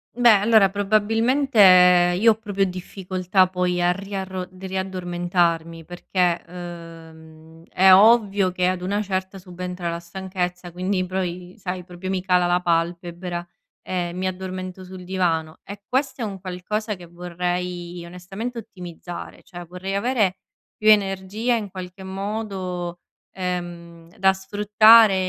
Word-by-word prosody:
Beh, 240 -1 +6
allora 210 -1 +5
probabilmente 225 +6 +1 0.6
io 225 +2 +6
ho - - 0
proprio 200 -2 0
difficoltà 185 +1 0
poi 180 -1 -1
a 175 - +3
riarro 190 -1 -5
riaddormentarmi, 175 -3 -2
perché, 175 0 -1
uhm, 165 -2 -11
è 190 +1 +6
ovvio 205 -2 +5
che 180 0 0
ad 185 -1 -1
una 200 +3 -1
certa 190 0 -3
subentra 180 -1 -5
la 170 - -4
stanchezza, 180 0 -5
quindi 185 +1 -1
poi 180 -1 -4
sai 180 -1 -5
proprio 180 +1 -8
mi 185 -1 -2
cala 180 -1 +3
la 175 +1 +2
palpebra, 175 +1 -2 0.4
ehm, 175 -1 -3
mi 185 - -2
addormento 185 0 -5
sul 185 0 -10
divano 170 -4 -1
e 200 0 -10
questo 265 0 -1
è - - -1
un 195 -3 -6
qualcosa 210 +4 -3
che 175 -2 -12
vorrei 175 0 -4
onestamente 195 +8 -7
ottimizzare. 180 -5 -9
Cioè 175 -1 -10
vorrei 180 +3 -6
avere 200 -3 +1 0.4
più 215 0 +3
energia 205 +3 +2
in 210 -3 -3
qualche 185 0 -9
modo, 190 -3 -4 0.3
ehm, 175 -2 -5
da 190 0 +4
sfruttare 210 +2 +5
185 Hz, 130 wpm, -23 LUFS, 175-195 Hz, 0.6 s, Beh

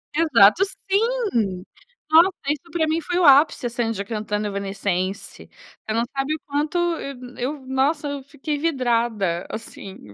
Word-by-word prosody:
Exato. 305 - +5 0.3
Sim! 395 - 0 0.5
Nossa, 335 +4 +7 0.2
isso 300 +3 -3
pra 320 -2 0
mim 320 +1 0
foi 355 +3 -2
o 360 - +3
ápice, 280 -2 +5
a - - 0
Sandy 225 -5 -2
cantando 210 -1 -3
Evanescense. 195 -1 -3 0.4
Você 215 - -3
não 230 +1 +1
sabe 275 +3 -1
o - - -9
quanto 295 +4 -1
eu 335 -6 -1
n 250 0 -11
eu, 275 0 -4
nossa, 280 +3 0
eu 285 -2 -5
fiquei 290 +1 -4
vidrada, 235 - 0
assim, 195 - -9
265 Hz, 155 wpm, -22 LUFS, 215-315 Hz, 0.5 s, Nossa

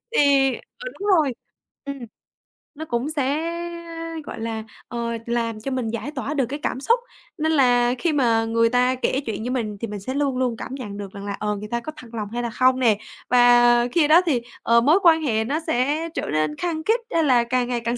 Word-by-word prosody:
thì 275 - +4
ờ, 480 - -14
đúng 405 - -3
rồi, 290 -5 +1 0.5
ừm. 280 -1 -5 0.8
Nó 315 +2 -6
cũng 245 0 -2
sẽ, 290 -1 0 0.8
gọi - - -7
là, 225 -1 -3 0.2
ờ, 240 - -5 0.3
làm 230 -2 -2
cho 270 - -4
mình 255 -3 -2
giải 230 +5 -4
tỏa 285 0 -4
được 275 -4 +1
cái 280 +5 -5
cảm 255 - -1
xúc, 465 - +2 0.4
nên 315 +1 0
là 245 -4 +4
khi 335 -3 +1
mà 230 -5 +2
người 230 0 +2
ta 250 +1 +2
kể 255 +1 0
chuyện 220 -2 -4
với 245 - -3
mình 220 -5 -2
thì 230 - -2
mình 205 -1 -6
sẽ 230 +7 -5
luôn 280 -2 0
luôn 250 -3 0
cảm 260 - -6
nhận 210 -7 -7
được 200 -2 -7
rằng 200 0 -8
là, 200 - -3
ờ, 210 0 -1
người 210 +1 -7
ta 235 - 0
có 275 +6 -7
thật 245 - -11
lòng 210 -3 -4
hay 240 0 -2
là 235 - -2
không 255 +3 +3
nè. 225 -5 +3 0.3
Và 240 -1 +5
khi 315 0 +3
đó 325 +4 +7
thì, 270 -8 +1 0.2
ờ, 235 0 +4
mối 305 +10 +4
quan 325 -2 +6
hệ 225 -7 +1
nó 280 +7 -1
sẽ 300 +4 0
trở - - -3
nên 155 -1 0
khăng 335 -3 -2
khít, 450 +3 +3
hay 330 - +3
là 250 -5 +4
càng 245 +1 0
ngày 245 -1 -1
càng 235 +1 -2
250 Hz, 230 wpm, -23 LUFS, 230-285 Hz, 0.8 s, đó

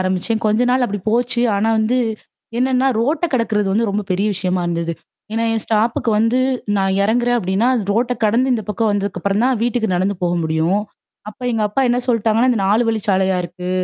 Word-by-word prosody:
ஆரம்பிச்சேன். 185 +4 -1
கொஞ்ச 215 +2 +2
நாள் 255 0 +2
அப்டி 205 -2 -4
போச்சு. 240 +1 +1
ஆனா 220 +3 +1
வந்து 230 +4 +1 0.6
என்னன்னா, 260 +1 +2
ரோட்ட 295 +9 0
கடக்குறது 215 -5 0
வந்து 225 +3 +1
ரொம்ப 205 +1 -1
பெரிய 195 +3 +1
விஷயமா 185 -1 -1
இருந்தது. 170 -1 -2 0.4
ஏன்னா, 225 +1 0
என் 225 - -1
ஸ்டாப்புக்கு 230 +3 0
வந்து 230 +3 +2 0.4
நான் 195 0 +1
இறங்குறேன் 240 +3 +1
அப்டின்னா, 195 +4 0
அது 230 - 0
ரோட்ட 240 +3 +1
கடந்து 240 +5 +2
இந்த 230 -3 -1
பக்கம் 215 +1 0
வந்ததுக்குப்புறம் 200 +1 -1
தான் 255 -2 +1
வீட்டுக்கு 235 -2 0
நடந்து 190 +3 0
போக 175 0 +1
முடியும். 160 +5 +1 0.5
அப்ப 215 - -12
எங்கப்பா 215 +3 0
என்ன 245 +1 +2
சொல்ட்டாங்கன்னா, 230 +1 +2
இந்த 225 -5 0
4 215 +4 +3
வழிச்சாலையா 190 -4 +1
இருக்கு. 180 +1 -6
215 Hz, 180 wpm, -18 LUFS, 195-240 Hz, 0.6 s, 4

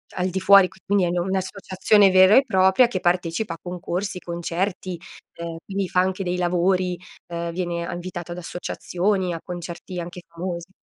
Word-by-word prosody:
al 185 0 0
di 190 +1 -3
fuori, 195 -1 +7 0.2
quindi 200 -2 +2
è - - 0
in 175 +1 -1
un'associazione 190 +2 +2
vera 185 +2 +7
e 270 - +7
propria 190 +4 +4
che 185 - -2
partecipa 175 +1 0
a - - -8
concorsi, 180 +1 -4
concerti. 175 +1 -3 0.4
Ehm, 170 -1 -5
quindi 195 -1 -2
fa 180 - +3
anche 190 +1 -1
dei 180 0 -1
lavori, 180 +1 +1 0.3
ehm, 170 0 -4
viene 170 -1 -2
a - - -4
invitato 175 -1 -6
ad 175 - -9
associazioni, 180 +1 -2
a 165 - -4
concerti 175 +1 -7
anche 175 +1 -8
famosi. 170 +1 -6
180 Hz, 170 wpm, -23 LUFS, 175-190 Hz, 0.4 s, fuori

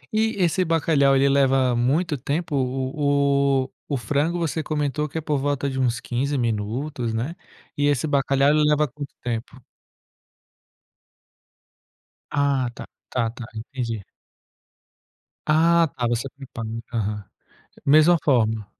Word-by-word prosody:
E 220 +1 +1
esse 185 0 +2
bacalhau, 155 -4 +3
ele 135 +1 +4
leva 135 -2 +3
muito 150 +8 +1
tempo 155 +4 -2
o 140 +1 +1
o 130 - -16 0.2
o 140 - 0
frango, 145 +9 0
você 165 -1 -1
comentou 150 0 -1
que 150 - -6
é 160 - -1
por 150 -1 -1
volta 140 0 -1
de 135 - -4
uns 120 -2 +1
15 135 +4 -2
minutos, 120 +2 -2
né, 125 +10 -3 0.4
e 145 0 +2
esse 145 -1 +1
bacalhau, 140 -1 +2
ele 155 0 +3
leva 150 0 +3
quanto 140 +1 -8
tempo? 120 +2 -5 2.7
Ah, 140 -3 +1
tá - - -9 0.2
tá 120 -3 0
tá, 120 0 -8
entendi. 115 -2 -4 1.4
Ah 165 +2 +4
tá, 120 -1 0
você 120 +2 -1
limpa 130 -4 -8
limpa, 115 +1 -6
aham. 105 -1 -2 0.6
Mesma 155 +4 +6
forma. 110 -6 +2
140 Hz, 135 wpm, -23 LUFS, 120-150 Hz, 2.7 s, Mesma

